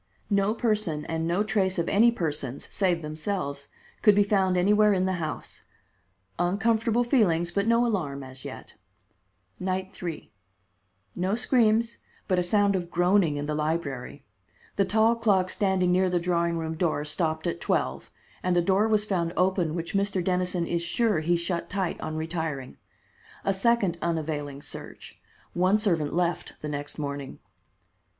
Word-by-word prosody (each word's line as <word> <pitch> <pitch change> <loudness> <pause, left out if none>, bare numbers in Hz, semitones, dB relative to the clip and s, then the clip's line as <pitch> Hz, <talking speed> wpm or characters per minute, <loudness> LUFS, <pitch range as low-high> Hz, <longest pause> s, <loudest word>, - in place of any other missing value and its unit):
No 200 +2 +2
person 215 -10 0
and 165 0 -2
no 175 +5 +1
trace 195 -3 0
of 170 - 0
any 230 +4 +5
persons, 150 - -3
save 180 -4 +1
themselves, 150 -2 -3 0.3
could 210 -2 +6
be 205 - +5
found 190 -3 +2
anywhere 210 +3 +4
in 185 -1 +1
the 185 -2 -1
house. 155 -1 -5 0.8
Uncomfortable 220 +5 +2
feelings, 175 -9 +2
but 200 +3 0
no 230 +1 +4
alarm 150 - -2
as 130 0 -10
yet. - - -9 0.9
Night 185 +1 -2
3: 170 -3 -6 0.8
No 185 +3 0
screams, 235 -2 +2 0.3
but 185 -2 +2
a - - +3
sound 200 +2 +2
of 175 -2 -3
groaning 175 -3 +2
in 145 - -3
the 150 - -2
library. 150 -4 -3 0.5
The 200 - +2
tall 220 +4 +3
clock 200 -5 +2
standing 190 -3 +1
near 185 +1 +3
the 180 -1 +1
drawing 170 -1 0
room 160 -1 -3
door 160 -3 -1
stopped 160 +1 -1
at 170 0 -2
twelve, - - -1 0.3
and 180 -1 +1
a - - +5
door 195 +4 +3
was 215 -1 +2
found 175 -5 -1
open 180 -3 +1
which 170 -1 -4
Mr. 195 -2 0
Dennison 180 -1 0
is 170 0 -1
sure 205 +2 +1
he 170 +3 +1
shut 170 0 -2
tight 190 -3 -2
on 155 0 -4
retiring. 160 -5 -4 0.7
A 195 - +2
second 195 -4 +1
unavailing 150 -4 -3
search. - - -9 0.3
One 185 +4 +3
servant 170 -9 0
left 175 -1 -1
the 150 - -4
next 145 0 -5
morning. 140 -2 -5
180 Hz, 155 wpm, -27 LUFS, 160-200 Hz, 0.9 s, could